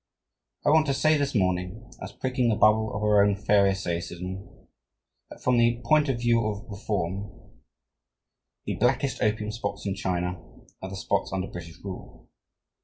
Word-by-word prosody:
I 145 - +5
want 155 0 +4
to 140 - +1
say 155 +3 +4
this 140 -2 -1
morning, 95 +4 -1
as 95 - -6
pricking 125 +2 0
the 110 - +2
bubble 110 +1 +4
of 105 - -3
our 105 -1 +5
own 100 -1 +3
Pharisaism, 95 -2 0 0.8
that - - -13
from 125 -1 +3
the 120 0 +3
point 150 +1 +4
of 130 - +1
view 120 -1 +3
of 105 +2 -4
reform, 100 -1 -3 1.3
the - - -3
blackest 130 +2 +1
opium 105 0 0
spots 100 -3 -5
in 100 - 0
China 90 -2 -2 0.4
are 95 - -5
the 95 - -6
spots - - -1
under 95 -1 -1
British 85 -3 -9
rule." 95 -2 -9
105 Hz, 160 wpm, -26 LUFS, 95-120 Hz, 1.3 s, I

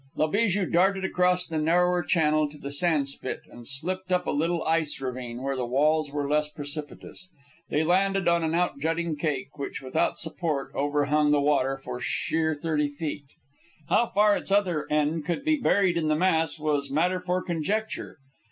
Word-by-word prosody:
La 155 - +2
Bijou 200 +2 +1
darted 190 +3 +2
across 180 -1 +2
the 160 -1 -3
narrower 175 +3 +2
channel 155 -1 +2
to 150 - -13
the 140 -1 -6
sand 150 -1 +1
spit 135 -1 -4
and 120 -1 -11
slipped 185 +7 -3
up 180 0 +2
a - - -1
little 165 +3 0
ice 160 -2 0
ravine, 125 -2 -5
where 135 0 -1
the 130 - -2
walls 150 +4 +2
were 145 -1 -2
less 150 +1 +1
precipitous. 150 +4 -7 0.4
They 150 - +1
landed 195 +3 +2
on 170 0 +3
an 160 +1 0
out 175 -5 0
jutting 165 +2 -1
cake, 145 -2 -3
which, 140 - -4
without 135 +4 -1
support, 160 -4 -2
overhung 145 +1 +1
the 145 0 +4
water 140 -2 +1
for 125 -2 -7
sheer 160 +4 0
thirty 150 -1 -1
feet. 145 -1 -5 0.6
How 235 +2 +3
far 210 0 +3
its - - -5
other 185 -6 +1
end 150 +1 +1
could 175 - -3
be 310 0 +3
buried 195 -9 +2
in 160 -2 0
the 155 - +2
mass 160 -2 +1
was 150 -2 -1
matter 175 +6 +1
for 180 0 -1
conjecture. 190 +6 -3
155 Hz, 180 wpm, -26 LUFS, 145-180 Hz, 0.6 s, the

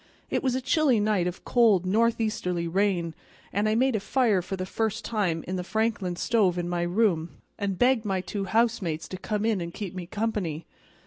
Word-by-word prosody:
It - - +1
was 260 -2 0
a 260 - -1
chilly 270 -3 +3
night 205 -4 +1
of 180 - -6
cold 220 -7 +4
northeasterly 215 -4 +1
rain, 180 -2 0 0.4
and 205 +2 +1
I 215 - +2
made 260 +1 +2
a - - +1
fire 215 -2 +2
for 195 - -4
the 185 -1 -4
first 220 +3 -2
time 185 -8 -1
in 185 +1 -2
the 180 - -3
Franklin 210 -3 -1
stove 195 -3 +2
in 175 -1 -2
my 175 0 -1
room, 175 -2 +1 0.2
and 200 -2 -1
begged 245 0 +3
my 195 -3 -1
two 195 +1 -4
housemates 195 -7 0
to 185 - -5
come 210 +3 -2
in 220 -5 +1
and 170 0 -4
keep 200 -1 -6
me 180 -2 -6
company. 200 -7 -2
200 Hz, 200 wpm, -27 LUFS, 180-225 Hz, 0.4 s, cold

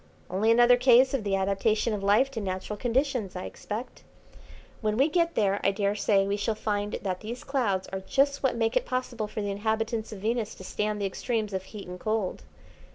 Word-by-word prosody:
"Only 200 +4 +1
another 240 +1 +6
case 255 +1 +5
of 265 -5 0
the 200 -1 0
adaptation 200 +4 +1
of 205 - -3
life 210 +7 +3
to 230 -4 -4
natural 190 +1 -3
conditions, 245 -3 -1
I 180 - -4
expect. 220 +5 -7 0.8
When 215 -1 0
we 270 +4 +5
get 335 +1 +1
there 200 -2 +2
I - - +4
daresay 200 0 +1
we 200 +1 -1
shall 215 +2 -1
find 205 -1 -2
that 185 -2 -2
these 235 +3 -7
clouds 220 -9 0
are 190 - -4
just 280 +8 +1
what 265 -3 +1
make 225 0 0
it - - +1
possible 250 -4 -2
for 210 0 -4
the 200 - -2
inhabitants 220 +2 -1
of 215 - -6
Venus 225 0 -1
to - - -11
stand 210 +2 -2
the 200 - -1
extremes 215 +1 -2
of 190 0 -3
heat 205 -1 -9
and 180 0 -7
cold. 215 -2 -1
215 Hz, 205 wpm, -27 LUFS, 200-240 Hz, 0.8 s, another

